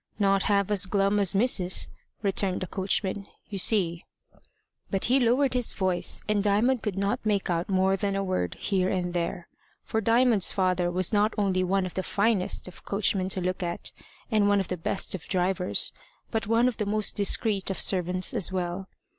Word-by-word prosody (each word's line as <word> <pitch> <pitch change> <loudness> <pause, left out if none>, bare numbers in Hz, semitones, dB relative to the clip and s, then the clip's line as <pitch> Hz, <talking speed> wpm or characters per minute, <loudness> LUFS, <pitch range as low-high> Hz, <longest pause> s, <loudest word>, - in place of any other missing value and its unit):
"Not 195 -1 +2
half 200 0 +2
as 200 -2 +2
glum 200 +1 +1
as 195 -1 +3
Mis'ess," 195 -4 +3 0.4
returned 195 -1 0
the - - -2
coachman. 195 +1 -2 0.2
"You 200 - -2
see 175 -4 +2 0.5
" - - -43
But 195 - -1
he 260 +3 +3
lowered 255 +2 +2
his 250 -2 -1
voice, 185 -2 +1
and 210 -1 +1
Diamond 215 +5 +2
could 205 -3 -3
not 200 +1 -1
make 205 -4 0
out 170 +2 -2
more 190 0 +2
than 200 0 -2
a 195 - -1
word 185 - -2
here 190 -2 0
and 180 -2 -2
there. 175 +1 -3 0.4
For 220 - -2
Diamond's 230 -2 +3
father 185 -2 +1
was 180 +3 +1
not 210 +1 +2
only 190 -3 +1
one 190 +1 0
of 185 - -6
the 190 - -2
finest 200 -1 0
of 185 - -12
coachmen 195 -2 0
to 185 - -1
look 185 +1 -2
at, 175 -1 -3 0.4
and 210 -2 +3
one 205 0 +3
of 190 - -3
the 185 - -1
best 175 +4 -1
of 190 - -6
drivers, 185 -1 +1 0.4
but 220 -3 -2
one 230 +2 +3
of 250 - -2
the 210 - -2
most 215 0 -1
discreet 200 0 0
of 195 - -3
servants 185 -1 0
as 190 - 0
well. 185 +1 -3
195 Hz, 195 wpm, -27 LUFS, 185-210 Hz, 0.5 s, as